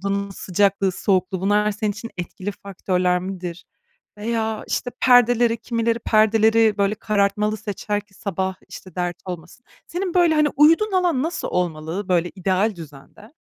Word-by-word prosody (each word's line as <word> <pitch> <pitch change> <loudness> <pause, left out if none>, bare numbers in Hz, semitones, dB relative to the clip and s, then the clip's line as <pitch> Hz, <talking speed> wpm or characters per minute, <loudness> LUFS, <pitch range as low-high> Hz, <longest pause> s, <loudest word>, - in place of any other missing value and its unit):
Odanın 200 0 -2
sıcaklığı, 195 0 +1
soğukluğu 185 0 0
bunlar 210 +2 +2
senin 210 +1 -2
için 230 +3 -8
etkili 185 +3 -5
faktörler 180 -2 0
midir? 180 -2 -6 0.5
Veya, 220 0 -2
işte, 245 - -2
perdeleri 245 -2 +5
kimileri 230 0 -1
perdeleri, 220 0 +3
böyle, 200 +1 +2
karartmalı 210 0 0
seçer 205 -1 -3
ki 205 -1 -25
sabah, 190 -1 -3
işte, 185 -3 -11
dert 175 -1 -2
olmasın. 180 +7 -9 0.2
Senin, 360 +1 -3
böyle, 345 -3 +4
hani, 300 -1 +3
uyuduğun 330 +9 +5
alan 355 -8 +2
nasıl 335 +3 -3
olmalı, 175 +2 -3
böyle, 175 -1 +1
ideal 190 +3 0
düzende? 165 - -13
205 Hz, 145 wpm, -22 LUFS, 185-230 Hz, 0.5 s, perdeleri